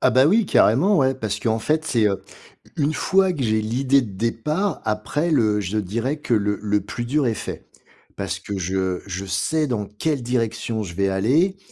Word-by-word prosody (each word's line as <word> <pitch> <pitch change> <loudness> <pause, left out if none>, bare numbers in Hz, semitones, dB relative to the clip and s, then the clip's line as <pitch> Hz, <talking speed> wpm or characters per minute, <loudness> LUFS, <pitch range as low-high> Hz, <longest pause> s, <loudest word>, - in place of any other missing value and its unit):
Ah, - - +4
bah, 130 +2 +5
oui, 210 +5 +3
carrément, 175 - +4
ouais, 135 -1 +3
parce 110 -6 -3
qu'en 115 -1 0
fait, 155 +5 0
c'est, 115 -7 +2
heu, 95 - -2 0.6
u 155 - -1
une 155 - 0
fois 190 +2 +2
que 150 -6 -3
j'ai 110 -2 +1
l'idée 130 +4 +2
de 110 - -7
départ, 150 - -1
après, 110 +10 -1
le 110 -7 +2
je 100 +2 -2
dirais 115 +9 -2
que 120 - 0
le 105 -1 0
le 105 0 +1
plus 120 - -5
dur 140 +3 +1
est 115 - +1
fait. - - -7 0.5
Parce - - -3
que 100 - -5
je 95 0 -1
je 95 +1 -4
sais 100 - 0
dans 110 -5 -2
quelle 135 +6 -2
direction, 115 -2 -1
je 85 -3 -7
vais 100 +1 +1
aller. 140 - +2
115 Hz, 205 wpm, -22 LUFS, 105-150 Hz, 0.6 s, bah